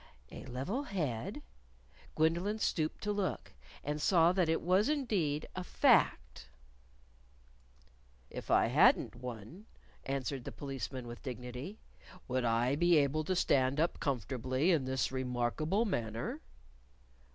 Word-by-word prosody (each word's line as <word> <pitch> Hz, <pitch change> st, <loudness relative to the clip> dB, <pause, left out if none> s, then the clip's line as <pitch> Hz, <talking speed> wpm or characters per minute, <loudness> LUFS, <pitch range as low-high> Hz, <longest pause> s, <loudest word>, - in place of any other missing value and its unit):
A -, -, -8 dB
level 135 Hz, -, -3 dB
head? 155 Hz, -, -3 dB, 0.7 s
Gwendolyn 170 Hz, +7 st, +1 dB
stooped 160 Hz, -7 st, -1 dB
to 210 Hz, -, 0 dB
look. 200 Hz, -3 st, -3 dB, 0.3 s
And 150 Hz, +1 st, -3 dB
saw 170 Hz, 0 st, +5 dB
that 180 Hz, -3 st, +1 dB
it 165 Hz, -, +1 dB
was 185 Hz, -, +3 dB
indeed 195 Hz, -, 0 dB
a 185 Hz, -, -3 dB
fact! -, -, +2 dB, 1.8 s
"If -, -, -7 dB
I -, -, +5 dB
hadn't 170 Hz, -, +4 dB
one," 125 Hz, -, -8 dB, 0.4 s
answered 135 Hz, -1 st, -3 dB
the -, -, -6 dB
Policeman 135 Hz, -3 st, -5 dB
with 120 Hz, 0 st, -8 dB
dignity, 125 Hz, -, -6 dB, 0.5 s
"would 130 Hz, -1 st, 0 dB
I 120 Hz, +3 st, +2 dB
be 175 Hz, +2 st, +4 dB
able 145 Hz, +2 st, +2 dB
to 185 Hz, -, 0 dB
stand 135 Hz, -4 st, +2 dB
up 165 Hz, +2 st, +1 dB
comfortably 130 Hz, -, 0 dB
in 155 Hz, -6 st, +2 dB
this 130 Hz, 0 st, -1 dB
remarkable 130 Hz, -, 0 dB
manner?" 115 Hz, -, -3 dB
145 Hz, 125 wpm, -33 LUFS, 125-180 Hz, 1.8 s, saw